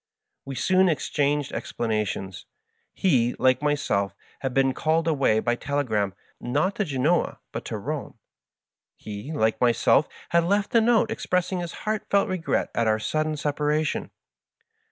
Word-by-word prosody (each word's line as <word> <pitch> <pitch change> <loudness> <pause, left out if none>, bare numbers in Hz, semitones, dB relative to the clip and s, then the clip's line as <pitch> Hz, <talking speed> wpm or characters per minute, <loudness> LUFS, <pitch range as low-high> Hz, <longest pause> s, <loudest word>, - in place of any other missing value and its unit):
We 135 - -6
soon 185 +7 +3
exchanged 145 -2 0
explanations. 105 -4 -3 0.4
He, 125 -10 +2
like 130 +1 +3
myself, 100 -10 0 0.2
had 135 - -2
been 135 +1 +2
called 160 +4 +1
away 135 -8 +3
by 120 - +1
telegram, 120 -7 -1 0.2
not 145 +10 0
to 210 - +1
Gbnoa, 150 +3 +1
but - - -6
to - - -4
Bome; - - -5 0.8
he, 105 +7 -7
like 110 -8 0
myself, 120 +4 +3 0.2
had 170 0 +3
left 200 +3 +1
a 230 - +6
note 225 -1 +3
expressing 180 -3 -1
his 175 -1 -5
heartfelt 210 -2 +1
regret 185 -3 -1
at 115 - +1
our 110 0 +3
sud 155 +8 -1
den 155 -1 -2
separation. 150 +1 -1
145 Hz, 140 wpm, -25 LUFS, 120-170 Hz, 0.8 s, a